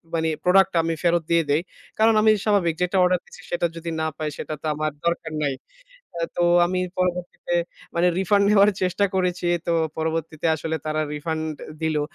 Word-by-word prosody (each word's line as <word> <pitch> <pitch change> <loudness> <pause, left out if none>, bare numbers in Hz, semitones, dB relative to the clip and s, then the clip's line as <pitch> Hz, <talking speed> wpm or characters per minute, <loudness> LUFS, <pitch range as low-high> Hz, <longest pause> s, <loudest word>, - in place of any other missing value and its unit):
মানি 160 0 +1
product 190 +1 +5
টা - - +1
আমি 165 0 0
ফেরত 170 -1 +2
দিয়ে 170 -1 +4
দেই। 150 +3 +3 0.4
কারণ 220 +1 +5
আমি 215 0 +6
স্বাভাবিক 185 -6 +2
যেটা 180 +2 +1
অর্ডার 180 0 +3
দিচ্ছি 180 - -14
সেটা 175 0 0
যদি 165 0 -5
না 160 - 0
পাই, 155 -1 -2
সেটা 155 - -5
তো - - -9
আমার 155 0 -1
দরকার 170 -1 -1
নাই। 140 -2 0 0.6
আ - - -4 0.2
তো 175 - +2 0.2
আমি 180 +1 -1 0.2
পরবর্তীতে 180 -1 -2 0.4
মানি 175 +1 +3
রিফান্ড 200 +2 +3
নেওয়ার 205 0 +6
চেষ্টা 185 +2 +2
করেছি। 180 -1 0 0.2
তো - - +2 0.3
পরবর্তীতে 160 0 -3
আসলে 160 +1 -3
তারা 155 0 0
রিফান্ড 160 +1 -3 0.4
দিলো। 155 -2 0
170 Hz, 185 wpm, -23 LUFS, 160-180 Hz, 0.6 s, আমি